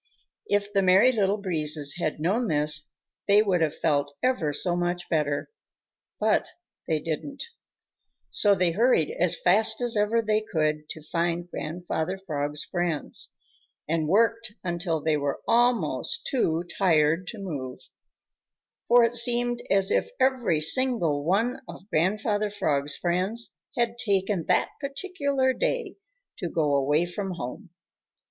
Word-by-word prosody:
If 205 0 0
the 195 - +3
Merry 190 +7 +5
Little 205 -3 +1
Breezes 155 -7 0
had 155 -3 -2
known 205 +10 0
this, 150 -3 +1 0.4
they 205 +1 +6
would 185 -5 +1
have 155 -2 0
felt 145 -2 0
ever 255 -13 +1
so 175 +4 0
much 175 0 -2
better. 150 - -1 0.7
But - - +2 0.4
they 160 -2 +1
didn't. 165 - -4 0.9
So 205 -1 +4
they 180 -2 +2
hurried 215 - +2
as 175 0 +1
fast 220 +4 +2
as 240 -2 -1
ever 215 +2 +2
they 215 0 +1
could 155 -6 -1
to 155 - -7
find 170 +1 -2
Grandfather 175 +2 -4
Frog's 150 -5 -3
friends 175 -4 -3 0.5
and 160 0 0
worked 225 +4 +2
until 170 -3 -2
they 155 -1 +1
were 140 -1 -2
almost 245 - +1
too 170 - 0
tired 170 -1 +1
to 225 - -6
move, 145 -10 -5 1.1
for 240 0 +6
it 230 0 +2
seemed 240 0 +2
as 195 -1 +3
if - - +1
every 245 - +2
single 165 - +2
one 225 - 0
of 190 - -11
Grandfather 205 +5 +1
Frog's 145 -8 -1
friends 185 +7 -1 0.2
had 235 0 0
taken 195 -5 0
that - - +2
particular 280 -3 -1
day 470 - -2 0.4
to 175 - -3
go 150 -4 0
away 145 +4 +2
from 190 +2 -4
home. 170 - -7
185 Hz, 140 wpm, -26 LUFS, 155-225 Hz, 1.1 s, they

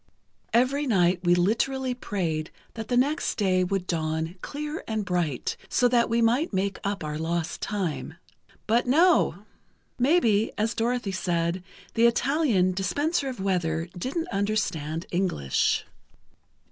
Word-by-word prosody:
"Every 270 +5 +2
night 180 -5 +3
we 175 0 +4
literally 250 +8 +1
prayed 170 -10 -3 0.2
that 225 -1 -6
the 245 - +1
next 290 +6 +1
day 185 -3 +2
would 185 0 -1
dawn 160 0 -2
clear 300 +2 -5
and 220 -2 -2
bright, 175 -8 -1
so 245 - +3
that 235 -1 +3
we 230 +1 +2
might 245 +8 +2
make 195 0 -1
up 200 -3 -2
our 150 0 -4
lost 165 +1 -2
time. 160 -8 -3 0.5
But 235 +3 +2
no! 285 - +3 0.5
Maybe, 240 -7 +3
as 220 +2 0
Dorothy 235 -2 -1
said, 175 -1 -1 0.3
the 230 +1 +5
Italian 235 - +2
'dispenser 285 - 0
of 255 - -7
weather,' 170 -4 -1
didn't 275 - -3
understand 170 -6 -1
English. 175 - +1
200 Hz, 135 wpm, -26 LUFS, 175-245 Hz, 0.5 s, the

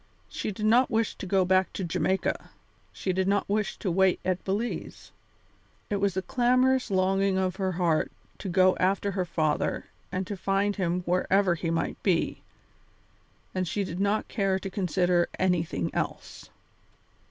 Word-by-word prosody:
She - - -4
did 210 +2 -4
not 240 +4 +5
wish 225 -1 +1
to 190 - -8
go 190 0 +3
back 185 +1 +3
to 195 - -4
Jamaica; 190 +2 -1 0.4
she 185 - -2
did 190 +1 0
not 200 0 +1
wish 205 -1 -1
to 190 - -2
wait 190 +1 +3
at 185 0 -1
Belize. 210 +5 -4 0.8
It 205 - +1
was 200 -2 0
the 190 - -1
clamorous 255 +2 +2
longing 195 0 +2
of 185 -1 0
her 190 -1 -1
heart 170 -3 +1 0.3
to 195 - -5
go 185 +1 +4
after 195 +2 +1
her 185 -2 -1
father 155 -3 -1 0.3
and 185 +1 -2
to 205 - -4
find 195 +2 0
him 180 -1 0
wherever 180 +1 +2
he 170 0 -3
might 165 0 -2
be, 180 -4 0 1.1
and 185 -1 -1
she 205 +4 -1
did 180 -1 -5
not 200 +2 +1
care 195 -3 0
to 190 0 -6
consider 180 -2 +1
anything 165 - 0
else. - - -4
190 Hz, 165 wpm, -27 LUFS, 180-200 Hz, 1.1 s, not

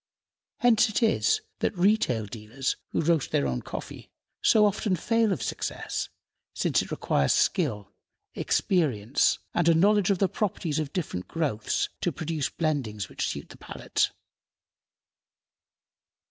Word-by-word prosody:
Hence 230 -2 +5
it 215 +3 0
is 435 - +3 0.2
that 200 - -1
retail 175 - +2
dealers, 115 +5 -3
who - - 0
roast 165 -2 +1
their 70 - +1
own 65 -2 -1
coffee, - - -8 0.3
so 215 -1 +5
often 205 -1 +1
fail 230 +4 +1
of 145 - -1
success, 105 - -3 0.5
since - - +2
it - - -7
requires 70 -1 +1
skill, 120 - 0 0.4
experience, 135 - +1 0.2
and 170 -1 +3
a 165 - +5
knowledge 205 +3 +4
of 200 - +3
the 195 - +2
properties 175 -7 -2
of 150 -3 -3
different 150 - -4
growths 145 -10 -1
to - - +1
produce 160 -3 -2
blendings 125 - -2
which - - -2
suit - - -5
the - - -12
palate. - - -1
165 Hz, 135 wpm, -27 LUFS, -, 0.5 s, Hence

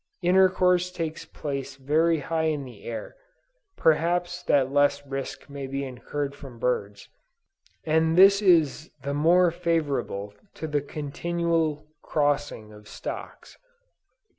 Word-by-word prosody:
Intercourse 180 0 +4
takes 165 -3 -5
place 140 -2 -5
very 155 +4 +1
high 160 +2 -1
in 150 -2 -2
the 120 -6 -12
air, 115 - -6 0.6
(perhaps 175 +3 +1
that 135 -6 +2
less 145 0 +2
risk 135 -1 -6
may 140 -1 -6
be 135 +1 -3
incurred 140 +2 -4
from 135 -5 -11
birds,) 105 -4 -2 0.8
and 160 +1 +2
this 195 +2 +7
is 160 -5 +3
the 140 +1 -2
more 170 +4 +4
favorable 145 - -2 0.2
to - - -5
the 150 -2 0
continual 155 +1 -2 0.2
crossing 145 -7 -1
of 105 0 -15
stocks. - - -8
150 Hz, 120 wpm, -26 LUFS, 135-170 Hz, 0.8 s, this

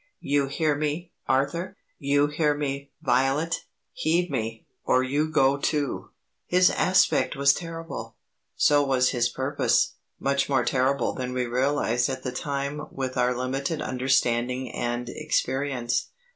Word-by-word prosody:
"You 140 -1 +1
hear 150 +2 +1
me, 155 +4 -3 0.2
Arthur; 170 +9 0 0.2
you 145 +1 +3
hear 150 0 +1
me, 140 -1 -3
Violet. 135 +6 +1 0.3
Heed 170 +2 0
me, 115 -3 -3 0.2
or 130 - +3
you 145 +4 0
go 140 -3 +3
too." 145 -1 -1 0.4
His 180 +1 +5
aspect 185 -4 +3
was 140 0 +5
terrible, 165 0 -6 0.4
so 145 -1 +4
was 130 -2 +2
his 120 -1 +1
purpose; 130 -1 +1 0.2
much 140 0 0
more 135 -2 +2
terrible 135 0 +1
than 125 -1 -4
we 125 -1 0
realized 125 -1 +1
at 130 -1 -4
the 125 - -2
time 140 +2 -3
with 130 -1 -4
our 125 0 +1
limited 135 +5 -2
understanding 125 -1 0
and 120 0 -3
experience. 135 -3 -1
140 Hz, 135 wpm, -26 LUFS, 125-150 Hz, 0.4 s, His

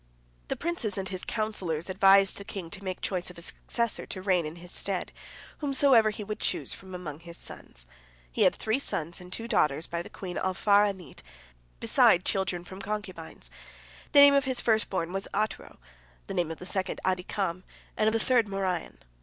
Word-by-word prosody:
The - - -1
princes 320 -12 -1
and 190 -1 -3
his 185 -1 -4
counsellors 190 -8 -1
advised 195 +1 +5
the 200 - -7
king 185 -4 -7
to 200 -1 -8
make 185 -1 -4
choice 180 -4 -2
of 180 - -12
a - - -9
successor, 235 +5 -2
to 185 - -5
reign 180 -5 +2
in 155 - -7
his 175 +1 -9
stead, 195 -2 -2 0.5
whomsoever 270 -6 +4
he 210 0 -5
would 210 +1 -5
choose - - 0
from 190 -1 -10
among 155 -5 -6
his 170 0 -9
sons. - - -8 0.5
He - - -3
had - - +5
three 220 +4 0
sons 170 - -2
and 180 0 -12
two 225 +4 -3
daughters 155 - +2
by 170 0 -3
the - - -9
queen 180 -2 -6
Alfar'anit, 195 -3 +1 0.6
beside 175 - +4
children 190 -3 -1
from 190 +2 -9
concubines. 200 -6 -6 0.6
The 285 - +9
name 285 0 +9
of 280 0 +3
his 260 -2 +2
first 220 -2 +2
born 175 -2 -2
was 195 0 -2
Atro, 215 +2 -2 0.5
the - - -6
name 175 -2 0
of 165 - -5
the 180 - -9
second 190 0 -2
Adikam, 185 -1 -1 0.3
and 215 - +2
of 220 - +3
the 225 - +2
third 235 -2 +3
Moryon. 190 -3 -3
190 Hz, 190 wpm, -28 LUFS, 175-215 Hz, 0.6 s, The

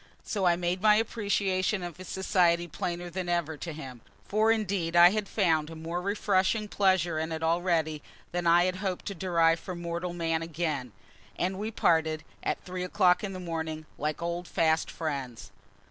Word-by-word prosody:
So 200 -3 -1
I 175 - +5
made 175 +1 -1
my 210 0 +6
appreciation 200 -3 0
of 175 -1 -6
his 185 -1 -10
society 175 -2 +2
plainer 175 +2 -4
than 180 0 -3
ever 170 -2 0
to 170 - -5
him; 130 -6 -9 0.3
for 215 +2 +3
indeed 195 -6 -1
I 175 +1 +9
had 210 -1 -2
found 160 -7 +2
a 165 - -8
more 165 +2 -4
refreshing 200 +1 +1
pleasure 185 -6 +2
in 160 +1 -3
it 160 0 -3
already 165 -2 +1 0.3
than 175 -1 -1
I 170 +1 +6
had 185 0 -1
hoped 190 -2 -3
to 200 - -3
derive 165 -2 +2
from 180 0 -7
mortal 170 +1 -3
man 165 -1 -1
again; 155 -6 -3 0.5
and 185 +2 -1
we 215 +2 -2
parted, 160 -6 +1 0.2
at - - -1
three 185 0 -5
o'clock 180 0 +3
in 195 -2 -3
the 185 - -6
morning, 160 -3 -4
like 150 +3 -2
old 170 +1 -3
fast 160 -1 +1
friends. 135 -7 -5
175 Hz, 180 wpm, -29 LUFS, 160-185 Hz, 0.5 s, I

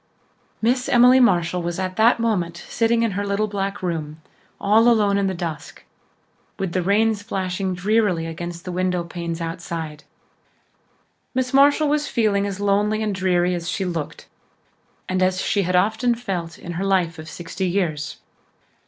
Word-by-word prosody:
Miss 250 +3 +1
Emily 250 +1 +6
Marshall 180 -7 +3
was 170 0 -3
at 185 -1 -3
that 230 +2 +4
moment 180 -7 -1
sitting 230 0 +1
in 230 - +1
her 200 +2 -2
little 200 +1 0
back 200 -1 -4
room, 160 -3 -3 0.4
all 220 +3 +4
alone 210 -4 +3
in 200 -1 +1
the 190 - -2
dusk, 165 -4 -6 0.7
with 190 -3 -2
the 185 - +1
rain 210 +5 +3
splashing 190 -2 -3
drearily 190 -3 +1
against 170 +1 -6
the 180 - -4
windowpanes 175 -2 -2
outside. 165 -2 -5 1.3
Miss 255 0 -1
Marshall 285 +2 +5
was 295 0 0
feeling 205 -4 +1
as 200 -1 -5
lonely 205 +2 +1
and 210 -2 -1
dreary 180 -1 +1
as 170 -1 -3
she 190 +2 -2
looked 170 -4 -5 0.8
and 185 0 -1
as 185 0 +2
she 200 - +1
had 180 -1 0
often 220 +6 +2
felt 185 -8 -4
in 175 - -8
her 175 +3 -3
life 180 -4 +1
of 155 0 -8
sixty 175 +3 -4
years. 165 -5 -2
190 Hz, 160 wpm, -22 LUFS, 175-215 Hz, 1.3 s, Emily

